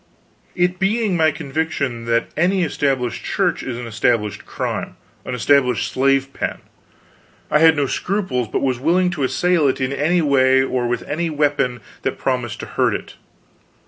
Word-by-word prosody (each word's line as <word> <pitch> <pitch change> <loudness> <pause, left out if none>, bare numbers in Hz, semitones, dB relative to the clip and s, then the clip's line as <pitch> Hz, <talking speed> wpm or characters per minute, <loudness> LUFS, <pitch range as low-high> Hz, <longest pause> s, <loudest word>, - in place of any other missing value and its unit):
It 180 0 +1
being 210 0 +1
my 160 -2 +4
conviction 145 -5 -3
that 115 0 0
any 180 +3 +2
Established 135 -6 -1
Church - - 0
is 125 -3 -5
an 125 - -6
established 110 -1 -1
crime, - - -4 0.3
an - - -3
established 125 -2 +2
slave 135 0 +1
pen, - - -3 0.9
I 150 - +4
had 160 0 +6
no 145 -1 +1
scruples, 175 - -1
but - - -2
was 130 -3 0
willing 180 +6 +2
to 155 -5 -3
assail 170 +3 +2
it 130 - 0
in 130 +1 -1
any 165 +5 +1
way 130 -2 +4
or 130 -2 -1
with 120 0 -2
any 165 +3 -1
weapon 145 -5 0 0.2
that - - -2
promised 125 -4 -2
to - - -5
hurt - - 0
it. - - -7
140 Hz, 165 wpm, -20 LUFS, 125-165 Hz, 0.9 s, had